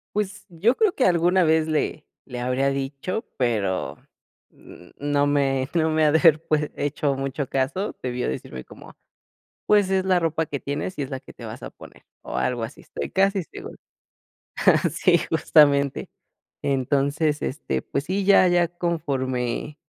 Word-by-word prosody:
Pues, 205 -1 -3
yo 190 +9 +1
creo 425 0 +2
que 260 - +2
alguna 180 +1 +3
vez 160 -1 +3
le 155 -1 -1 0.2
le 125 -2 -6
habría 130 +2 +1
dicho, 140 - -3
pero 105 -7 -1 0.5
n 90 - -16
no 145 0 +1
me 135 -2 +1
me 160 -2 +2
ha 150 - +4
de 160 - +4
haber 160 -2 +5
pu 155 - +2 0.2
hecho 145 -1 -1
mucho 135 +1 -3
caso. 135 +11 -2
Debió 125 -1 -2
decirme 65 0 -5
como: - - -14 0.7
“Pues 205 -2 +4
es 190 -1 +1
la 185 -1 +3
ropa 165 -1 0
que 145 - -4
tienes, 145 +6 -4
y - - 0
es 135 - -5
la 135 -1 -4
que - - -14
te - - -12
vas - - -8
a - - -7
poner”, - - -15 0.2
o - - -5
algo 125 -2 -1
así, 115 - -9
estoy - - -6
casi 195 0 +2
seguro. - - -10 1.2
Sí, - - +3
justamente. 140 -2 +3 0.5
Entonces, 140 +3 0
este, 145 - -3
pues 140 - -3
sí, 190 +4 -1
ya 195 -1 +6
ya 175 -1 +3
conforme 145 -5 -2
150 Hz, 165 wpm, -24 LUFS, 135-175 Hz, 1.2 s, ya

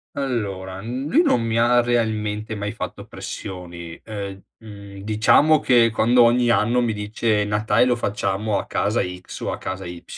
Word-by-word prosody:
Allora, 100 -8 -3
n 125 +5 -4
lui 290 - +4
non 125 - +2
mi 115 0 -1
ha 120 +1 +4
realmente 110 -2 -1
mai 105 0 -4
fatto - - -6
pressioni, 85 -3 -8
ehm, 100 -3 -7
mhmm, 100 -3 -11
diciamo 110 +9 +4
che, 120 -3 +4
quando 120 +2 +4
ogni 120 +1 +3
anno 115 +2 +3
mi 120 - 0
dice: 105 0 -1
"Natale 105 +2 +2
lo 125 -1 +2
facciamo 100 -1 -1
a - - -5
casa - - 0
x 90 0 -7
o - - -3
a - - -5
casa 95 0 -5
y" 85 0 -8
110 Hz, 170 wpm, -22 LUFS, 100-120 Hz, -, lui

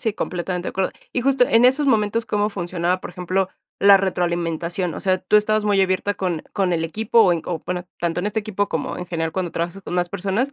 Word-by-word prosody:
Sí, 220 -3 0
completamente 180 -1 -3
de - - -2
acuerdo. 190 0 -1 0.2
Y 250 - 0
justo 265 0 +3
en 230 +2 +5
esos 265 +3 +4
momentos, 225 -1 +1
¿cómo 210 0 +1
funcionaba 180 -2 -2
por - - -7
ejemplo, 185 +1 -1 0.3
la 200 0 +8
retroalimentación? 175 -1 -1
O - - -6
sea, 185 -1 +1
tú 185 +3 +2
estabas 215 0 +2
muy 205 -2 +3
abierta 190 +2 +1
con 175 -5 -2
con 190 -3 0
el 165 -1 0
equipo, 220 +7 +2
o 180 -4 +4
en 165 - -2
o 170 -3 -4
bueno, 180 0 -3
tanto 170 0 -1
en 200 - -2
este 210 +1 -1
equipo 205 -1 -2
como 160 - -3
en 180 - -6
general 165 -2 -2
cuando 185 -2 -2
trabajas 175 +3 -3
con 180 - -6
más 175 -1 +1
personas, 200 +8 -1
185 Hz, 235 wpm, -22 LUFS, 175-210 Hz, 0.3 s, la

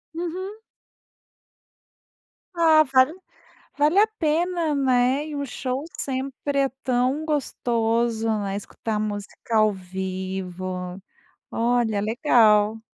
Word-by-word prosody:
Uhum. 360 +4 -4 2.0
Ah, 320 -2 +6
vale 260 +3 +5 0.7
vale 305 +7 +4
a 435 - +5
pena, 330 0 +1
né, 260 +1 +2
e 300 - -6
o 285 - -2
show 260 +2 -4
sempre 275 +1 -2
é 275 -1 +2
tão 255 +4 +1
gostoso, 235 -6 0
né, 195 -1 -3
escutar 210 +1 -4
música 210 +2 -4
ao 215 -1 +4
vivo, 185 0 -5 0.5
olha 230 -3 +1
legal. 220 -2 +3
245 Hz, 95 wpm, -24 LUFS, 210-295 Hz, 2.0 s, Ah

